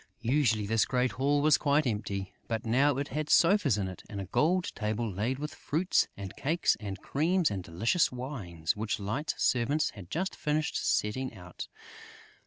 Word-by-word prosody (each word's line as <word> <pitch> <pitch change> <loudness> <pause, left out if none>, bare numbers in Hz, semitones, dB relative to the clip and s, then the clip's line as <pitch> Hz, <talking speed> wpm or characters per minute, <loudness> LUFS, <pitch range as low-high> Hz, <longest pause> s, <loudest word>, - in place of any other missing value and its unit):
Usually, 120 -4 +2
this 110 +2 +2
great 125 -1 +1
hall 145 +4 +1
was 155 -1 +5
quite 145 +1 +2
empty; 100 -4 -3
but 115 0 -2
now 135 +4 +3
it 140 +1 -2
had 155 0 -3
sofas 170 - +4
in 100 -2 -1
it 95 - -8
and 100 -4 -5
a 95 - -4
gold 165 - +1
table 110 +1 -2
laid 110 +6 -2
with 150 +2 -5
fruits 170 +5 +1
and 100 -1 -7
cakes 165 +5 +1
and 100 -3 -5
creams 170 - +1
and 95 -3 -3
delicious 110 - +1
wines, 110 - -3
which 110 +2 -2
Light's 115 +10 -2
servants 140 +5 +2
had 95 -4 -11
just 185 - -2
finished 150 0 -1
setting 130 +5 0
out. 90 -1 -8
125 Hz, 175 wpm, -30 LUFS, 105-150 Hz, -, was